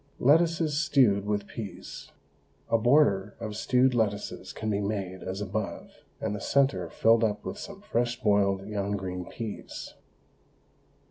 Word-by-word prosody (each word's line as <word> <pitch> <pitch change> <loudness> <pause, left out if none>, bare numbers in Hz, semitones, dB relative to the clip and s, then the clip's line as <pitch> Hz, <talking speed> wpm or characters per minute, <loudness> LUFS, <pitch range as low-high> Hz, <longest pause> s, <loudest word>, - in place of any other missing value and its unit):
LETTUCES 160 +1 +3
STEWED 125 - +3
WITH 105 -1 0
PEAS. 105 -2 -8 0.6
A 115 - +5
border 110 -6 +3
of 110 -2 -5
stewed 125 +4 +3
lettuces 105 -4 -1
can 110 0 -3
be 100 0 0
made 100 -3 -3
as 95 +2 -4
above, 105 +1 -4 0.3
and 110 - -2
the 105 - -6
centre 105 -12 +2
filled 115 +5 +4
up 105 -2 0
with 205 - -5
some 200 -1 -9
fresh 120 - -1
boiled 100 -2 +2
young 100 -1 -2
green 90 -2 -5
peas. 110 +1 -7
105 Hz, 140 wpm, -28 LUFS, 100-125 Hz, 0.6 s, A